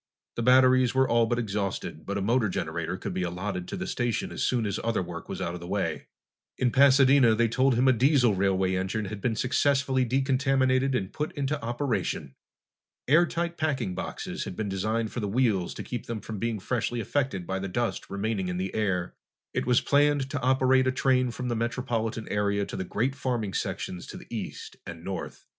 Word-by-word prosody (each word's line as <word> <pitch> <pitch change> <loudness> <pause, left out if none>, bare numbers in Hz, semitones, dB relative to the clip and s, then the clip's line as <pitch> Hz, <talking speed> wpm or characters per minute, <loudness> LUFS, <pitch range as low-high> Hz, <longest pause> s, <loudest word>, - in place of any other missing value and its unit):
The - - -2
batteries 130 +1 +5
were 130 0 +4
all 115 -1 +3
but 120 - 0
exhausted, 100 -4 -3
but 100 0 -2
a 100 - -1
motor 115 0 +2
generator - - -3
could - - -5
be - - -2
allotted 90 +1 -3
to - - -5
the 190 - -3
station 120 - -1
as - - -5
soon 120 -3 +1
as 100 0 -2
other 115 -4 0
work 85 -1 -8
was - - -4
out 85 - -2
of 90 - -6
the 85 - -9
way. 100 +1 -2 0.5
In 125 -1 +1
Pasadena, 135 -3 +6
they 115 +1 +3
told 130 +2 +2
him 125 +3 +3
a 130 - +6
diesel 125 -2 +4
railway 95 -1 +1
engine 95 +4 -1
had 100 +1 -6
been 115 0 0
successfully 135 +1 +2
decontaminated 130 +1 +2
and 95 -6 -2
put 150 +1 -3
into 145 0 -2
operation. 120 - -2 0.7
Airtight 170 +3 +2
packing 130 -11 -1
boxes - - -5
had - - -6
been 105 0 -3
designed 110 +4 -1
for - - -4
the 105 - -2
wheels 105 -5 +1
to - - -5
keep 120 -3 -6
them 115 -2 -3
from 105 0 -7
being 115 -1 -1
freshly 120 +3 -2
affected 115 -6 -1
by 95 +1 -2
the 100 - -3
dust 120 +5 -2
remaining 100 -1 -2
in 90 0 -2
the 95 +1 -3
air. 95 -5 -1 0.4
It - - -1
was 125 -1 +4
planned 145 -1 +2
to 145 -3 -2
operate 130 +1 +3
a - - +3
train 130 -1 +2
from 125 +2 -5
the 120 - -1
metropolitan 115 -2 -2
area 100 0 0
to - - -7
the - - -2
great 115 +8 -1
farming 120 -7 -2
sections 90 - -3
to - - -8
the - - -11
east - - -6
and 85 -1 -8
north. 95 +1 -6
120 Hz, 205 wpm, -27 LUFS, 100-130 Hz, 0.7 s, Pasadena